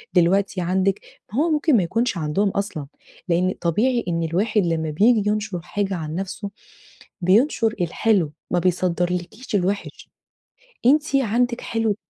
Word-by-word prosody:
ودلوقتي 185 +2 +2
عندِك، 190 +2 +1 0.3
ماهو 305 +8 +2
ممكن 300 -3 +3
ما 195 - +2
يكونش 225 +3 0
عندهم 165 +6 0
اصلًا، 185 -8 -3 0.4
لإن 180 +2 +2
طبيعي 235 +9 +1
إن 165 -1 0
الواحد 200 +5 +1
لما 160 -2 -1
بييجي 210 +6 +3
ينشر 210 -3 -2
حاجة 195 +2 -2
عن 155 -2 -5
نفسه 195 +2 -4 0.7
بينشر 220 - +3
الحلو، 175 -2 +1 0.2
ما 180 - +2
بيصدرلِكيش 180 +5 -1
الوحش، 200 +1 -2 0.8
أنتِ 295 +2 +3
عندِك 245 -1 +1
حلو 225 -2 -1
195 Hz, 130 wpm, -22 LUFS, 175-225 Hz, 0.8 s, ممكن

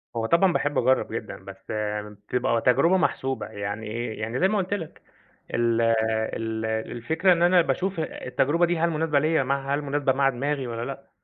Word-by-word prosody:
هو 115 -1 -1
طبعًا 170 +7 +3
باحب 145 -1 0
أجرب 130 +1 +2
جدًا، - - -5
بس - - -11 0.4
بتبقى 110 +3 -2
تجربة 165 +9 +4
محسوبة، 135 -6 -1
يعني 100 +2 -5
إيه؟ 115 0 -4
يعني 115 +3 -3
زي 190 - +4
ما 210 +1 0
قلُت 190 +1 -1
لك، 165 -6 -5 0.5
ال 115 -1 +2 0.5
ال 110 0 -3
الفكرة 120 +11 +1
إن 170 - -1
أنا 175 0 +6
باشوف 185 +1 -1
التجربة 155 +2 0
دي 175 -1 0
هل 170 +1 +2
مناسبة 155 -2 +1
ليَّ 155 -1 +2
مع 140 +1 -1
هل 150 - -2
مناسبة 140 -1 0
مع 135 0 +3
دماغي 135 +1 -2
والّا 115 0 -4
لأ، - - -8
135 Hz, 180 wpm, -25 LUFS, 115-165 Hz, 0.5 s, أنا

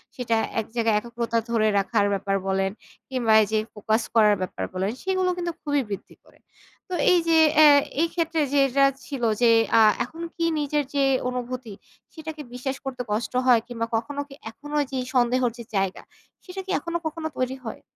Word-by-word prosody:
সেটা 235 -3 -1 0.2
এক 220 - -2
জায়গায় 225 -2 +2
একগ্রতা 235 0 -3
ধরে 225 -2 +2
রাখার 205 +1 +1
ব্যাপার 195 0 -1
বলেন 195 0 0 0.4
কিংবা 240 -4 +1
এইযে 215 +1 -1 0.2
focus 220 +2 0
করার 210 -2 +5
ব্যাপার 185 - -4
বলেন 190 +2 -1
সেগুলো 375 -1 +1
কিন্তু 345 -1 -2
খুবই 290 -2 0
বৃদ্ধি 200 - -7
করে। - - -24 0.5
তো 365 - -5 0.2
এই 355 - +5
যে 325 - +5 0.2
অ্যা 310 - +9 0.3
এইক্ষেত্রে 330 -1 0
যেটা 275 -1 +4 0.2
ছিল 270 -5 -6 0.2
যে 235 - +6 0.3
আ 225 - +7 0.2
এখন 325 +7 -10
কি 335 - -1
নিজের 295 0 0
যে 280 - +3 0.3
অনুভূতি, 250 -3 -5 0.4
সেটাকে 315 -1 -7
বিশ্বাস 265 +2 -4
করতে 255 -2 -4
কষ্ট 220 +4 -2
হয়? 235 -3 +6
কিংবা 230 -2 -3
কখনো 280 +6 -2
কি 275 - -13 0.2
এখনো 295 +5 -6
যে 265 - -3 0.2
সন্দেহের 245 0 +2
যে 235 - -7
জায়গা 195 -1 -1 0.4
সেটা 380 +1 -7
কি 380 - -5
এখনো 340 +3 -3
কখনো 315 0 -3
তৈরি 255 +1 -1
হয়? 220 - -6
250 Hz, 175 wpm, -24 LUFS, 225-295 Hz, 0.5 s, অ্যা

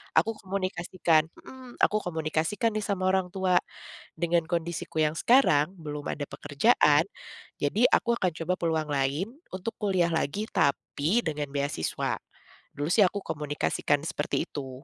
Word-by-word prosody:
Aku 225 - +4
komunikasikan 185 -4 0 0.2
mhm, 255 -2 -12
aku 210 - +4
komunikasikan 165 +6 -1
nih 215 - -1
sama 185 -2 +1
orang 190 -1 +1
tua, 185 -2 +3 0.6
dengan 170 -1 +2
kondisiku 170 -2 -3
yang 155 0 +1
sekarang 180 - +4
belum 150 -2 -6
ada 145 -1 -5
pekerjaan 145 - +3 0.6
jadi 215 - +4
aku 235 - +1
akan 180 -2 +1
coba 180 +3 0
peluang 160 -2 0
lain 140 +7 0 0.3
untuk 190 +5 -4
kuliah 185 -5 +1
lagi 160 +5 -1
tapi, 150 +8 +1
dengan 150 -2 -2
beasiswa. 140 - -2 0.6
Dulu 145 +2 -2
sih 210 - +6
aku 200 +2 -4
komunikasikan 145 -1 -1
seperti 150 -2 -1
itu. 135 -2 -7
165 Hz, 140 wpm, -28 LUFS, 145-190 Hz, 0.6 s, sih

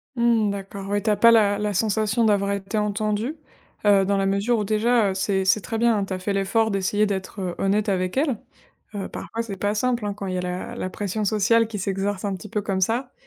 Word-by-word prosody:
Mmh, 235 -3 +3
d'accord, 195 0 -6
oui, 205 0 0
tu 220 - +1
as 210 - +3
pas 230 +3 +6
la 205 -3 +4
la 210 -1 -1
sensation 215 +3 +1
d'avoir 200 -1 +2
été 200 +2 -3
entendue. 210 +6 -1 0.5
Heu, 200 -1 +5
dans 200 0 +1
la 195 - +1
mesure 200 +5 +1
où, 210 - 0
déjà, 215 +1 +2
heu, - - -3
c'est 190 0 0
c'est 200 +2 +3
très 225 - -4
bien. 225 -3 +2
Tu 190 - -5
as - - -2
fait 200 +2 -2
l'effort 210 +3 +1
d'essayer 200 +2 +1
d'être, 195 0 -4
heu, 180 -2 -3
honnête 205 +2 +1
avec 185 +3 -1
elles. 275 -6 +1 0.6
Heu, 200 - -4
parfois, 230 +1 -5
c'est 200 -4 -6
pas 205 +2 -1
simple, 240 0 0
hein, 205 - -1
quand 200 -1 -6
il 185 - -3
y - - -1
a - - 0
la 180 +6 -4
la 185 - -3
pression 205 +2 -3
sociale 220 +3 +3
qui 215 -2 -6
s'exerce 195 +1 -2
un 200 -1 -1
petit 210 +3 -9
peu 210 -2 -1
comme 190 -1 -2
ça. 245 +6 0
205 Hz, 245 wpm, -23 LUFS, 195-220 Hz, 0.6 s, pas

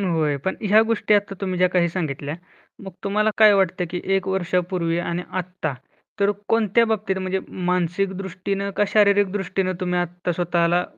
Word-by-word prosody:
होय, 160 -6 +1
पण 190 - 0
ह्या 210 0 +5
गोष्टी 225 -1 +1
आता 200 -1 +1
तुम्ही 185 -2 -2
ज्या 180 0 +4
काही 180 -1 +2
सांगितल्या, 150 -4 -3 0.5
मग 190 - -8
तुम्हाला 210 +2 +2
काय 215 -1 +8
वाटतं 185 -1 +1
की 180 - -3
1 190 0 0
वर्षापूर्वी 180 -2 0
आणि 175 0 -2
आत्ता, 180 -5 -4 0.5
तर 200 - +4 0.2
कोणत्या 225 0 +3
बाबतीत 210 -3 -1
म्हणजे 185 0 -2
मानसिक 180 +2 -1
दृष्टीनं 195 +1 -3
का 205 - +3
शारीरिक 205 -2 +4
दृष्टीनं, 195 -1 -1
तुम्ही 180 -1 0
आत्ता 175 0 -3
स्वतःला 175 0 +1
185 Hz, 165 wpm, -22 LUFS, 175-200 Hz, 0.5 s, काय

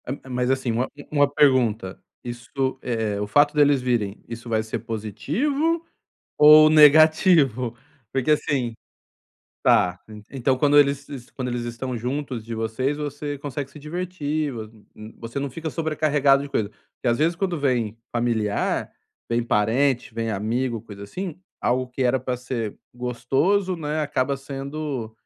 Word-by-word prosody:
É - - -4
é, 135 - -13
mas, 125 0 -1
assim, 130 -2 0
uma 120 +3 0
u - - -13 0.2
uma 145 -2 +3
pergunta. 120 -9 +2 0.2
Isso 120 -1 -8 0.3
é 110 -4 -2
o 105 - -2
fato 145 +7 +4
deles 145 -2 +4
virem, 115 -5 -1
isso 120 +1 -8
vai 110 -1 +1
ser 110 +1 -4
positivo 205 - -1 0.5
ou 155 +1 +9
negativo? 150 - +5 0.4
Porque 135 +2 +1
assim 135 -5 0 0.9
tá. 90 0 +3
En 105 -1 -11
então 135 0 0
quando 145 +2 +4
eles 140 -1 +4
se 140 -3 -10
quando 130 -2 -4
eles 120 -1 -3
estão 120 +2 -4
juntos 125 -1 -4
de 115 0 -5
vocês, 115 +6 -1
você 145 0 -4
consegue 140 -1 -5
se - - -12
divertir, 155 -2 -3
vo 115 -3 -5
hum 110 -1 -20
hum 110 +1 -11
você 115 +4 -5
não 140 0 -3
fica 160 +5 -5
sobrecarregado 150 -3 +2
de - - -7
coisa. 110 -7 -1
Porque 110 +3 -7
às 120 - +2
vezes 165 +3 +2
quando 180 -2 -2
vem 120 -6 0
familiar, 115 -3 -1 0.4
vem 120 0 +1
parente, 115 +2 +1
vem 115 0 -2
amigo, 115 +4 -1
coisa 100 -1 -11
assim, 170 - -6 0.2
algo 125 +1 0
que 125 +1 -3
era 125 +1 +2
pra 125 0 -2
ser 120 -4 -4 0.2
gostoso, 135 +11 0
né, 155 -1 -2
acaba 140 -2 0
sendo 135 -3 -5
130 Hz, 160 wpm, -23 LUFS, 115-145 Hz, 0.9 s, ou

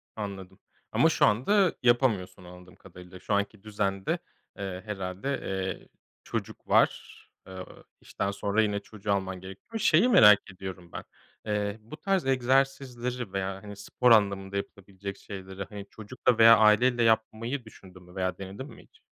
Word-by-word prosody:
Anladım. 95 -3 -7 0.3
Ama - - +4
şu - - +3
anda 180 - +3
yapamıyorsun 110 -7 +1
anladığım 90 +1 -14
kadarıyla. 90 0 -13
Şu 105 - -3
anki 100 0 -1
düzende, 100 -2 -2 0.4
eee, 95 -2 -5
herhâlde, 100 +6 -4
eee, 95 0 -4 0.4
çocuk - - -6
var. - - +2 0.3
Eee, 95 -1 -8 0.4
işten 100 - -3
sonra 100 +2 0
yine 105 -1 0
çocuğu 105 0 -6
alman 95 -2 -3
gerekiyor. 95 - -8
Şeyi 185 +4 +4
merak 105 - +8
ediyorum 90 -2 -9
ben, - - -6 0.4
eee, 105 0 -2
bu 115 +9 -11
tarz 195 -4 0
egzersizleri 125 -3 0
veya, 95 0 -3
hani, 105 -1 -9
spor 120 +4 +1
anlamında 100 -2 +3
yapılabilecek 100 0 -7
şeyleri, 95 -1 -8
hani, 100 -1 -9
çocukla 115 +2 -1
veya 115 0 +8
aileyle 120 +3 +4
yapmayı 115 +3 0
düşündün 95 -4 -15
mü 90 +1 -17
veya 95 -1 -2
denedin 100 +7 -8
mi - - -14
hiç? - - -26
100 Hz, 145 wpm, -28 LUFS, 95-115 Hz, 0.4 s, merak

